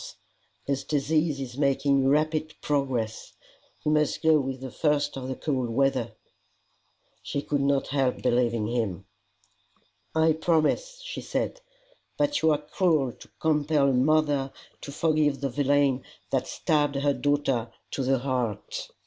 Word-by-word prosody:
His 140 -1 -2
disease 150 +1 0
is 130 0 -6
making 140 -1 +2
rapid 155 +2 +1
progress. 130 -6 -2 0.5
He 150 - +1
must 150 +2 +1
go 160 -1 +5
with 135 -1 -3
the 130 -1 -7
first 150 -2 0
of 130 -1 -5
the 130 - -3
cold 130 -4 -2
weather." 125 -2 +1 1.1
She 140 - -3
could 145 -1 0
not 140 0 +1
help 135 -2 0
believing 120 -3 +2
him. 110 -6 -2 1.1
"I 160 0 +4
promise," 170 - 0
she - - -5
said. - - -3 0.6
"But 290 0 +1
you 160 - +4
are 150 - +4
cruel 150 -3 +1
to - - -15
compel 150 -2 +2
a - - +2
mother 145 0 +2 0.3
to 140 - -7
forgive 150 -2 +1
the 140 0 -1
villain 140 -1 +2 0.3
that - - 0
stabbed 145 -3 0
her 140 +1 +2
daughter 135 -5 0 0.2
to 135 - -2
the 135 +1 +2
heart." 125 -5 -3
140 Hz, 140 wpm, -27 LUFS, 130-150 Hz, 1.1 s, go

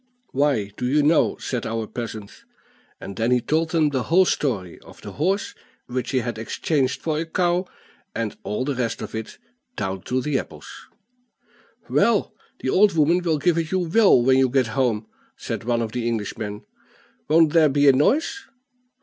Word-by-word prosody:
"Why, 130 -8 +1
do 125 - -2
you 145 +3 +2
know" 155 +2 +3
said 125 -3 -4
our 115 0 -2
peasant. 110 -3 -8 0.6
And 100 - -8
then 115 +1 +1
he 125 0 +4
told 160 +6 0
them 160 -2 +2
the 135 -3 -1
whole 185 +3 +4
story 105 - -2
of - - -16
the - - -7
horse, 190 +7 -1 0.3
which 125 0 -4
he 130 -2 +1
had 120 -2 -4
exchanged 130 +3 -1
for 155 -2 -2
a 165 - -2
cow, 175 +2 0 0.5
and 115 -1 -3
all 105 +5 -3
the 145 - -1
rest 125 -3 -3
of - - -8
it, 110 0 -6 0.4
down 95 -1 -3
to 130 - 0
the 140 +1 0
apples. - - -10 1.2
"Well, 230 -4 +2 0.3
your 130 - 0
old 205 +1 +5
woman 165 +4 +3
will 165 -3 0
give 170 +3 +1
it 160 -1 -3
you 185 +1 0
well 205 - +5
when 130 +2 +4
you 130 -1 +3
get 130 0 +2
home," 120 -5 0 0.3
said - - -5
one 120 -1 +1
of 110 - -5
the 120 0 -2
Englishmen. 105 -2 -4 0.6
"Won't 160 0 +4
there 160 -3 +5
be 145 +1 +3
a 135 - +8
noise?" 310 - +1
135 Hz, 185 wpm, -23 LUFS, 115-160 Hz, 1.2 s, a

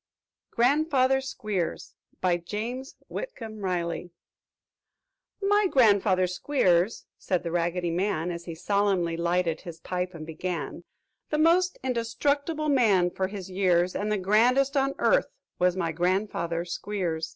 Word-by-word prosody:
GRANDFATHER 265 +1 +3
SQUEERS 210 -9 -3 0.3
BY 180 -1 +2
JAMES 230 +9 -5
WHITCOMB 225 - -7
RILEY 175 -1 -2 1.3
"My 410 0 +4
grandfather 200 - +4
Squeers," 185 -1 +1
said 180 -2 -1
the 170 - -3
Raggedy 175 0 0
Man, 175 -1 -1
As 170 0 -6
he 165 - -6
solemnly 195 -2 +1
lighted 170 -1 0
his 165 -2 -9
pipe 180 +1 -3
and 155 -1 -7
began 165 0 -5 0.4
"The 300 - 0
most 345 +3 +3
indestructible 280 +6 -1
man, 205 -10 +3
for 190 +1 -1
his 195 -1 -7
years, 180 -1 +2
And 210 +1 -1
the 210 - +2
grandest 245 +8 +3
on 275 0 +1
earth, - - +3 0.3
was 180 0 +2
my 170 -3 0
grandfather 175 -1 -1
Squeers! 175 -3 -3
190 Hz, 130 wpm, -27 LUFS, 175-250 Hz, 1.3 s, My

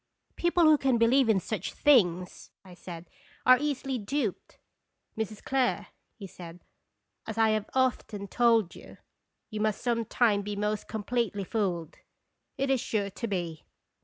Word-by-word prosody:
" - - -54
People 345 0 +2
who 310 -2 +6
can 265 -3 +2
believe 235 +2 +4
in 210 -3 +4
such 215 +4 -4
things," 185 -11 +2 0.2
I 185 - -12
said, 175 -1 -10 0.4
"are 255 0 +7
easily 270 -3 -2
duped/' 220 -1 -3 0.6
"Mrs. 215 -1 -5
Clare," 265 -2 0 0.3
he 205 - -9
said, 175 -2 -11 0.6
"as 220 0 -5
I 225 -1 +4
have 215 -1 -1
often 240 -6 0
told 230 -3 +2
you, - - -13 0.5
you 215 -1 -3
must 215 -1 0
some 235 -2 0
time 215 -3 +2
be 205 +1 -5
most 210 +1 -2
com 215 -1 -5
pletely 225 -4 -1
fooled. 175 -6 -2 0.6
It 270 0 0
is 260 -3 +2
sure 200 -3 -2
to 230 - -5
be. 175 -6 -4
220 Hz, 160 wpm, -28 LUFS, 200-250 Hz, 0.6 s, are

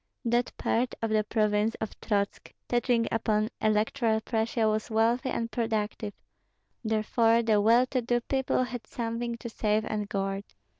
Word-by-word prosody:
That 240 +1 +1
part 245 +2 0
of 225 - 0
the 215 0 +3
province 215 0 +1
of 220 - -4
Trotsk 200 -2 -1 0.2
touching 240 -1 +2
upon 215 -1 +1
Electoral 220 +2 +2
Prussia 225 0 0
was 215 +1 0
wealthy 230 +3 +2
and 230 -2 -2
productive; 215 -2 -2 0.7
therefore 225 +1 +2
the 215 -2 +3
well 230 +4 +5
to 255 0 -1
do 240 +1 +1
people 265 0 0
had 245 -2 -6
something 235 0 -3
to 235 - -7
save 215 -1 0
and 210 -1 -3
guard. 195 0 -2
225 Hz, 150 wpm, -28 LUFS, 215-235 Hz, 0.7 s, well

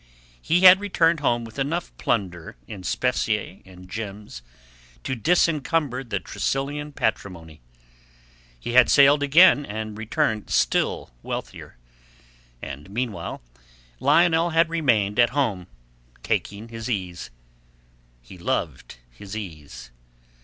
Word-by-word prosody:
He 175 +3 +1
had 185 0 +9
returned 170 -6 +1 0.2
with 115 +4 -10
enough 165 +6 -3
plunder 90 - -2
in 100 - -8
specie 90 - -1
and 90 -1 -14
gems 105 - -7 0.6
to - - -3
disencumber 150 - +1
the 105 -6 -3
Tressilian 145 +6 -3
patrimony. 85 - -4 1.0
He 120 - -5
had 125 - +6
sailed 145 +1 +6
again 145 +1 +6
and 110 -3 -6
returned 110 0 -2
still - - 0
wealthier. - - -7 0.9
And 70 +5 -8
meanwhile, 105 - -4 0.6
Lionel 170 0 +3
had 165 0 +2
remained 120 -11 +1
at 120 -1 +5
home 100 -10 -1 0.6
taking 105 +3 -3
his 115 +1 -7
ease. 90 -6 -4 0.9
He 90 +9 -14
loved 85 - -3 0.2
his 100 - -9
ease. 75 - -9
115 Hz, 110 wpm, -23 LUFS, 95-145 Hz, 1.0 s, had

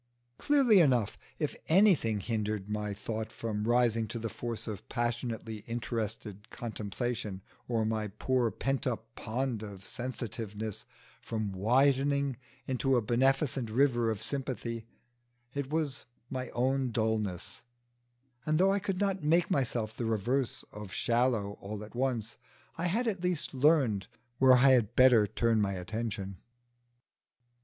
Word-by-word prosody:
Clearly 270 -8 +5
enough, 125 - +3 0.2
if 150 -3 -2
anything 160 - +4
hindered 105 -2 -2
my 105 0 -2
thought 110 +2 -4
from 105 -2 -3
rising 115 -1 +3
to 115 - -5
the 115 0 -3
force 115 -1 -5
of 105 -4 -7
passionately 120 -2 -2
interested 110 -3 -4
contemplation, 110 -2 -4 0.2
or 115 -2 +1
my 110 -1 -1
poor 120 +4 0
pent 135 +3 -1
up 115 -2 -4
pond 120 0 -2
of 100 -3 -8
sensitiveness 110 -4 -5 0.4
from 110 -3 -3
widening 135 +6 +2 0.3
into 130 0 +1
a - - +3
beneficent 130 +1 +2
river 120 -1 +3
of 110 -1 -2
sympathy, 115 -3 -3 0.7
it 140 -2 -3
was 150 -5 -2 0.3
my 130 -2 -3
own 130 +1 +1
dulness; 110 -5 -2 0.8
and 155 +2 +1
though 190 +3 +4
I 200 - +1
could 195 -2 -2
not 195 -2 0
make 165 +3 +3
myself 115 -5 0
the 120 - -3
reverse 115 +4 0
of 105 -2 -8
shallow 115 -3 +1
all 105 +1 -5
at 105 - -11
once, 120 -3 -1 0.4
I 170 +2 -1
had 230 +8 0
at 195 -5 -1
least 180 -5 0
learned 130 - +3 0.3
where 130 -1 +7
I 130 +2 +6
had 120 -3 +3
better 125 -5 +6
turn 115 +2 +2
my 100 -1 +1
attention. 100 0 -4
120 Hz, 135 wpm, -31 LUFS, 110-135 Hz, 0.8 s, where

